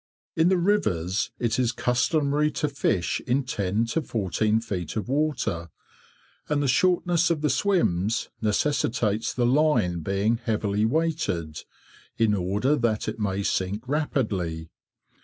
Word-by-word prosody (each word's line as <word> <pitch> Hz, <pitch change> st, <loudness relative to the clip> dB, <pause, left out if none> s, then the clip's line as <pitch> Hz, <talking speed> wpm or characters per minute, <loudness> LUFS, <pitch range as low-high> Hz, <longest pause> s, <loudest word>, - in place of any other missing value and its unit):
In 165 Hz, +2 st, +4 dB
the 190 Hz, -, +3 dB
rivers 105 Hz, -, 0 dB
it 120 Hz, 0 st, 0 dB
is 120 Hz, -2 st, +2 dB
customary 145 Hz, +5 st, +1 dB
to 150 Hz, -, -1 dB
fish 130 Hz, -10 st, -1 dB
in 130 Hz, +3 st, +2 dB
10 105 Hz, -2 st, -1 dB
to 140 Hz, +8 st, -1 dB
14 110 Hz, -, 0 dB
feet 95 Hz, -8 st, -5 dB
of 110 Hz, -, -3 dB
water, 130 Hz, -, -1 dB, 0.8 s
and 145 Hz, -1 st, +1 dB
the -, -, +1 dB
shortness 175 Hz, +4 st, +2 dB
of 165 Hz, -3 st, 0 dB
the 150 Hz, -3 st, +2 dB
swims 120 Hz, -, +1 dB
necessitates 110 Hz, -1 st, 0 dB
the 125 Hz, -, 0 dB
line 130 Hz, -, +2 dB
being 100 Hz, +7 st, 0 dB
heavily 105 Hz, -2 st, 0 dB
weighted, 120 Hz, -, -1 dB, 0.6 s
in 110 Hz, -2 st, +3 dB
order 105 Hz, +9 st, +1 dB
that 115 Hz, -4 st, 0 dB
it -, -, -4 dB
may 100 Hz, -1 st, -1 dB
sink 100 Hz, +5 st, -2 dB
rapidly. 100 Hz, -, -2 dB
115 Hz, 135 wpm, -25 LUFS, 100-150 Hz, 0.8 s, In